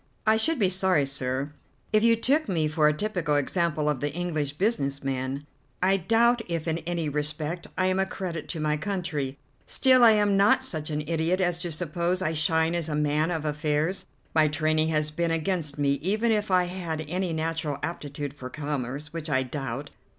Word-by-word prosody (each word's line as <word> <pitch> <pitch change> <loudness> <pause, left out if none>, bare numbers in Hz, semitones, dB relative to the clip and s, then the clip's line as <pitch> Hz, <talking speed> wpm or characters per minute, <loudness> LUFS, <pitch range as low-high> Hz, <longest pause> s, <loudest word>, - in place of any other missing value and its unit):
"I 220 0 +5
should 310 +9 +2
be 200 -6 +3
sorry, 185 -5 +2
sir, 135 +1 -2 0.4
if 215 - +5
you 230 0 +5
took 275 +4 +1
me 160 -4 +1
for 150 0 +3
a - - +5
typical 170 -3 -1
example 155 +1 0
of 150 -3 +1
the 145 +2 -1
English 155 -4 -2
business 145 -7 -1
man. 135 +1 -3 0.3
I 190 +2 +3
doubt 230 +6 +3
if 165 -1 -2
in 165 0 0
any 170 -1 -2
respect 150 +3 -3
I 185 - +2
am 185 0 +1
a 190 - +1
credit 175 -5 -5
to 165 - -3
my 150 0 +1
country, 155 -6 -3 0.3
still 255 -2 +5
I 225 -2 +8
am 205 -1 +3
not 205 +6 +4
such 160 -12 -3
an 150 0 -1
idiot 165 +3 0
as 175 -2 +1
to 175 -1 -4
suppose 170 +2 -1
I 160 - 0
shine 160 +1 +2
as 170 -2 -2
a 150 - -1
man 150 +2 +1
of 160 -3 -2
affairs. 150 +4 -1 0.3
My 155 -1 +5
training 155 +1 +1
has 155 -1 0
been 170 +2 -1
against 165 -2 -1
me, 140 -1 +2
even 215 +7 +1
if 210 -1 0
I 185 -1 +4
had 175 -3 -4
any 180 +2 -1
natural 160 -2 -2
aptitude 145 -3 -4
for 130 -3 -8
commerce, 145 0 -4
which 165 -1 -5
I 130 -2 +2
doubt. 135 +1 -5
160 Hz, 195 wpm, -27 LUFS, 150-185 Hz, 0.4 s, I